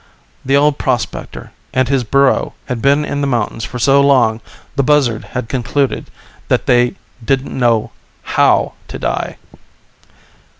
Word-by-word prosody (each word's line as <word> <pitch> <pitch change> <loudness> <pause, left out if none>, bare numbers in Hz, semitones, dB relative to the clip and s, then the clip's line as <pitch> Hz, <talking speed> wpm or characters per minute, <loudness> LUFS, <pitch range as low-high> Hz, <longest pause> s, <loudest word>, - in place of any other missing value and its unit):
The 135 +2 +2
old 145 0 +2
prospector 125 -3 -3 0.2
and 130 0 +2
his 135 -1 +1
burro 140 +3 +2
had 125 -4 -4
been 140 +3 +3
in 145 -1 -3
the 140 - 0
mountains 115 -3 -1
for 125 - -5
so 135 +3 +4
long 125 -5 +3 0.3
the 140 - +2
buzzard 135 -5 +2
had 125 -2 -5
concluded 135 +2 -1 0.4
they 120 0 +2 0.3
didn't 135 +2 -1
know 115 -3 +2 0.3
how - - +2
to - - -7
die. - - -3
130 Hz, 135 wpm, -16 LUFS, 120-140 Hz, 0.4 s, so